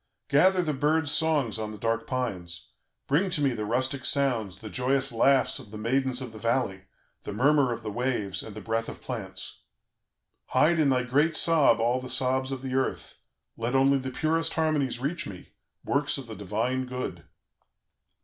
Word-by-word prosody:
Gather 180 +5 +4
the 155 -3 -1
birds' 150 +2 +1
songs 145 -10 +2
on 110 -1 -3
the 105 - -8
dark 115 +2 -1
pines; 90 -10 -4 0.4
bring 170 +8 +1
to 175 - +1
me 140 -2 +2
the 110 -3 -3
rustic 130 +3 0
sounds, 120 -10 +1
the 110 - -9
joyous 135 +1 +1
laughs 130 +3 +3
of - - -12
the 105 - -8
maidens 130 +3 0
of 125 - -7
the 110 - -11
valley, 115 -5 -1 0.4
the - - -6
murmur 135 +4 +3
of 115 -1 -5
the 105 - -4
waves, 120 -4 -1
and 105 - -9
the 110 - -7
breath 115 0 -2
of - - -8
plants. - - -6 0.9
Hide 155 +6 +3
in 150 -3 +4
thy 130 -1 +2
great 145 +6 +2
sob 155 -8 +4
all 120 +3 +1
the 130 - -6
sobs 130 +1 +2
of 135 -1 -5
the 130 -1 -4
earth; 130 0 -2 0.4
let 115 +3 -2
only 135 +1 +4
the 130 0 -4
purest 160 +5 0
harmonies 155 -6 0
reach 140 +7 -2
me, 90 -3 -10 0.4
works 145 +1 +1
of 135 - -7
the 115 -2 -8
divine 115 +6 -2
Good! 125 0 -5
130 Hz, 185 wpm, -27 LUFS, 115-140 Hz, 0.9 s, Gather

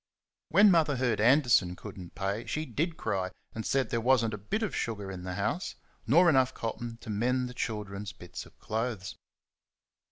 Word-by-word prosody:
When 205 0 +7
Mother 155 -5 +3
heard 120 -5 +1
Anderson 120 -7 +4
could 105 +2 -9
n't 90 -3 -10
pay, 100 +3 -2
she 155 +1 -2
DID 160 +6 -2
cry, 95 -4 -1 0.2
and 110 - -4
said 135 -1 0
there 115 - 0
was 125 -1 +4
n't 110 - -2
a - - -3
bit 210 - -2
of 215 - -2
sugar 105 -4 -3
in 95 -1 -7
the 90 0 -5
house, 100 - -2 0.3
nor 170 +9 +6
enough 130 -5 +4
cotton 115 +1 -4
to 115 - -6
mend 125 +4 +1
the 125 - -8
children's 105 -4 -4
bits - - -9
of - - -22
clothes. 110 -4 -3
115 Hz, 190 wpm, -30 LUFS, 100-130 Hz, 0.3 s, When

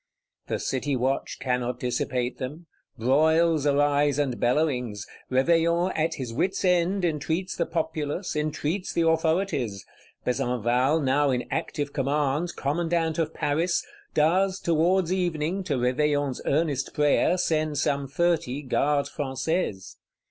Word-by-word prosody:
The - - -1
City 135 +1 -1
watch 130 +2 -1
cannot 125 -1 -1
dissipate 125 0 -2
them; 145 +6 -6 0.3
broils 155 +5 +3
arise 145 0 +2
and 140 -4 -1
bellowings; 125 -6 0 0.2
Réveillon, 170 +6 +2
at 160 +1 0
his 125 -4 -5
wits' 190 +9 0
end, 180 +1 +2
entreats 165 +3 -2
the 170 - -1
Populace, 160 +1 -2
entreats 155 +4 -2
the 165 -1 +2
authorities. 160 - 0 0.4
Besenval, 125 +3 +1
now 140 +2 +2
in 125 -2 0
active 145 -3 -3
command, 145 +3 0
Commandant 165 +2 0
of 160 -1 0
Paris, 165 +4 0 0.3
does, 185 +5 +2
towards 170 +2 +2
evening, 175 0 -1
to 145 - 0
Réveillon's 140 +2 0
earnest 145 -2 0
prayer, 150 +4 +3
send 155 -4 0
some 140 +1 0
thirty 150 -2 0
Gardes 140 +2 +1
Françaises. 135 - -2
150 Hz, 120 wpm, -26 LUFS, 135-165 Hz, 0.4 s, broils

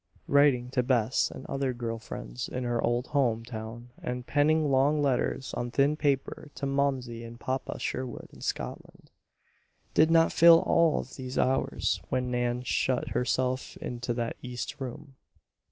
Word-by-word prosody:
Writing 140 -4 +4
to 130 - +2
Bess 120 -2 +2
and 130 - -9
other 135 -2 -1
girl 115 -1 -4
friends - - -6
in 125 - -3
her 120 -1 -1
old 120 +1 +1
home 120 -6 +1
town 115 +1 -8
and 125 0 -4
penning 150 +1 +2
long 140 +3 +3
letters 135 -1 0
on 120 - -2
thin 140 +4 +2
paper 145 0 -1
to 140 - -4
Momsey 135 -4 -1
and 115 0 -10
Papa 130 +1 -3
Sherwood 130 -2 -4
in - - -14
Scotland, - - -5 0.8
did 155 - +5
not 165 0 +4
fill 170 0 +8
all 165 -2 +3
of - - -12
these 130 -1 -6
hours 130 +1 +1
when 125 -1 -1
Nan 120 0 0
shut 125 0 0
herself 130 +1 -1
into 120 -1 -4
that 115 -1 -3
east 125 +2 -6
room. 135 +2 -7
130 Hz, 155 wpm, -29 LUFS, 120-140 Hz, 0.8 s, fill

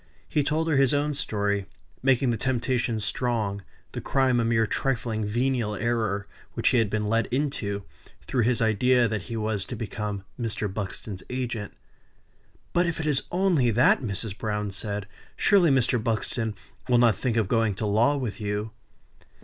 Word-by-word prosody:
He 150 - +1
told 155 +3 0
her 155 -4 +2
his 135 0 +4
own 145 +1 +1
story; 100 -7 -1 0.3
making 130 -1 +3
the - - 0
temptation 120 -1 0
strong; 105 -2 -1 0.3
the - - -5
crime 130 -3 +2
a - - +2
mere 115 -1 +2
trifling, 115 -2 -1
venial 120 0 0
error, 110 -4 -1 0.3
which - - +2
he 125 - +3
had 110 -3 +2
been 105 0 -1
led 115 +2 +1
into, 120 -7 -2 0.4
through 125 - 0
his 115 0 +2
idea 120 +3 +3
that 110 -2 -2
he 115 - -3
was 110 -2 -1
to 120 - -6
become 105 -2 -4 0.2
Mr. 110 -2 -2
Buxton's 100 -1 -5
agent. 120 -5 -3 1.0
"But 175 0 +3
if 170 - -2
it 160 - -2
is 145 -3 +2
only 175 -9 +3
that," 120 +3 +4
said 125 - -4
Mrs. 100 +1 -3
Browne, 105 -2 -2 0.6
"surely 195 -5 +4
Mr. 125 -3 +2
Buxton 110 0 -1 0.3
will 125 - +5
not 120 -3 +5
think 120 +2 -1
of 110 -4 +2
going 115 -2 +1
to 105 - -3
law 115 +8 +3
with 120 -5 -4
you?" 105 +1 -2
115 Hz, 170 wpm, -26 LUFS, 105-130 Hz, 1.0 s, will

